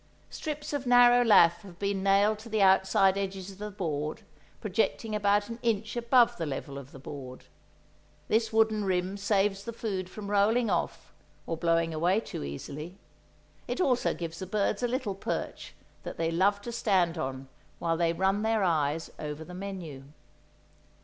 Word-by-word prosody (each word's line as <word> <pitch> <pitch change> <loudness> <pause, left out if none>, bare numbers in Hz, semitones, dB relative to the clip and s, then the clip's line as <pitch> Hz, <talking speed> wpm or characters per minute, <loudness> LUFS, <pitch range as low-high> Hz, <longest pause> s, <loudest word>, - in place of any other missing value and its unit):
Strips 300 -1 -5
of 275 -3 -3
narrow 245 0 +7
lath 170 -7 +6
have 185 -4 -13
been 200 0 -1
nailed 200 +2 +3
to 225 +2 -11
the 215 -2 +2
outside 190 0 +4
edges 195 -1 -4
of 195 - -15
the 210 0 -4
board, 155 -7 -3 0.4
projecting 215 +2 -1
about 205 0 +2
an 230 +1 -7
inch 220 -1 -1
above 240 0 +3
the 165 - -2
level 140 0 -5
of 140 0 -12
the - - -11
board. 130 -1 -9 0.8
This 225 +1 +1
wooden 220 -1 +2
rim 185 0 0
saves 200 -1 +1
the 235 - -5
food 195 -5 -4
from 205 +1 -7
rolling 215 +3 +3
off, - - -2 0.3
or 165 - -2
blowing 165 0 +1
away 175 +6 +2
too 225 - -6
easily; 150 - -7 0.7
it 245 - -3
also 260 -9 +2
gives 165 -1 -6
the 185 - -5
birds 200 +1 0
a 245 - +1
little 240 -4 -2
perch 195 - -5 0.3
that - - -7
they 165 0 0
love 200 +4 +2
to 235 - -5
stand 190 -7 +1
on 135 -2 -4 0.3
while 165 -1 0
they 165 0 +1
run 190 +4 +1
their 220 -1 +1
eyes 160 -3 0
over 150 +1 -5
the 180 - -10
menu. 180 -8 -7
195 Hz, 170 wpm, -29 LUFS, 170-220 Hz, 0.8 s, narrow